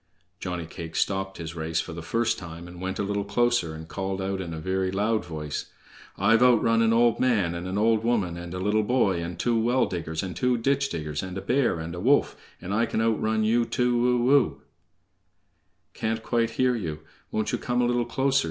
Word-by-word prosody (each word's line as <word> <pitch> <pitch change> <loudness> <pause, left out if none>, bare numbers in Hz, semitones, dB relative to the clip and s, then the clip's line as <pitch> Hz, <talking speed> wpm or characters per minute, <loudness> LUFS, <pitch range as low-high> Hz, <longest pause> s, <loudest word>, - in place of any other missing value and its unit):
Johnny 90 -2 -4
cake 80 0 -8
stopped 95 0 -1
his 80 -1 -6
race 80 0 -1
for 80 - -4
the 85 - -6
first 115 +8 0
time, 85 -1 -9
and 90 0 -11
went 95 0 -3
a - - -1
little 100 0 -1
closer, 100 -5 +1
and 80 0 -9
called 95 +1 -3
out 95 0 -2
in 85 -3 -5
a 80 - -5
very 95 +2 -1
loud 105 +3 0
voice: 75 -3 -5 0.5
"_I've 110 +4 +4
outrun 115 -2 +4
an 115 0 +4
old 115 0 +3
man, 105 -9 +2
and 85 +1 -5
an 95 +2 -2
old 110 +1 +3
woman, 105 -8 +1
and 85 0 -7
a - - -3
little 105 +3 +2
boy, 105 -6 +1
and 85 0 -5
two 115 +3 +1
well 120 +3 +2
diggers, 80 -2 -4
and 90 -3 -5
two 125 +6 +1
ditch 140 +4 +1
diggers, 75 -2 -3
and 95 0 -6
a - - -3
bear, 125 +1 +1
and 80 +1 -5
a 90 - -5
wolf, 135 +9 +3 0.2
and 95 +2 -5
I 115 +3 +2
can - - -2
outrun 110 -1 +1
you 115 +2 +3
too 125 0 +1
o - - +4
o!_" 70 - -3 1.3
"Can't 110 0 -2
quite 115 -1 +1
hear 130 -1 +3
you; 80 -8 -4 0.3
won't 110 0 -1
you - - -1
come 125 0 -1
a 125 - +3
little 120 0 +1
closer?" 135 +3 +1
100 Hz, 215 wpm, -26 LUFS, 85-120 Hz, 1.3 s, I've